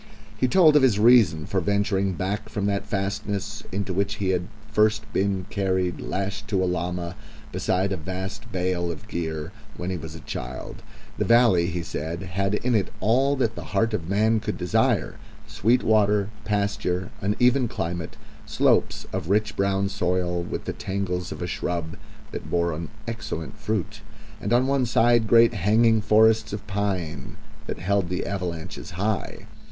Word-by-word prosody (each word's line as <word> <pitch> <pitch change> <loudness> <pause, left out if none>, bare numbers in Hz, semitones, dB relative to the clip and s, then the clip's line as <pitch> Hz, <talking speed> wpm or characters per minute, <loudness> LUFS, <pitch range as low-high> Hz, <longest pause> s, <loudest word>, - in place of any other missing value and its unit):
He 130 - +1
told 160 0 +6
of 150 - +7
his 125 -6 +4
reason 105 -9 +5
for 95 +2 0
venturing 100 0 +1
back 100 +4 -3
from 100 -2 -2
that 100 -1 -1
fastness, 100 +1 -3
into 100 -1 -2
which 100 +2 0
he 100 -3 -1
had 90 -1 0 0.2
first 110 +1 +3
been 95 -1 0
carried 95 -3 0
lashed 95 +1 -3
to 95 -3 +1
a - - +2
llama, 90 0 -2 0.4
beside 95 +2 0
a 95 - -1
vast 95 +6 -6
bale 90 -2 -1
of 85 +6 -9
gear, 80 -5 -4 0.3
when 90 +1 -3
he 90 - -2
was 80 0 -8
a - - -8
child. 65 -4 -6 0.4
The - - +1
valley, 115 -8 +5
he 85 -1 -3
said, 85 +2 -4
had 95 +2 -1
in 125 +3 0
it 105 -4 +1
all 130 +7 +3
that 120 -5 0
the - - -7
heart 115 0 +2
of 85 -5 -3
man 110 +3 +3
could 105 -1 -3
desire 90 -1 +1 0.3
sweet 120 +5 +1
water, 105 -1 +3
pasture, 100 -2 -1
and 100 +1 0
even 125 +1 +4
climate, 85 -6 -4 0.3
slopes - - +2
of 90 -3 -3
rich 105 +1 +1
brown 100 0 +1
soil 90 -3 0
with 85 - -5
tangles 90 -2 -2
of - - -5
a - - -1
shrub 85 -2 -3 0.4
that - - -6
bore 85 -1 +1
an 80 +2 -5 0.2
excellent 110 -4 -5
fruit, 105 -3 -3 0.4
and 105 - -3
on 120 +2 +4
one 135 -2 +1
side 120 0 +3
great 115 +1 +6
hanging 110 +3 +3
forests 110 +1 +4
of 105 0 -5
pine 100 -6 -3 0.3
that - - -3
held 95 0 0
the 90 - -2
avalanches 90 -5 -4
high. 100 0 -2
100 Hz, 170 wpm, -25 LUFS, 90-110 Hz, 0.4 s, of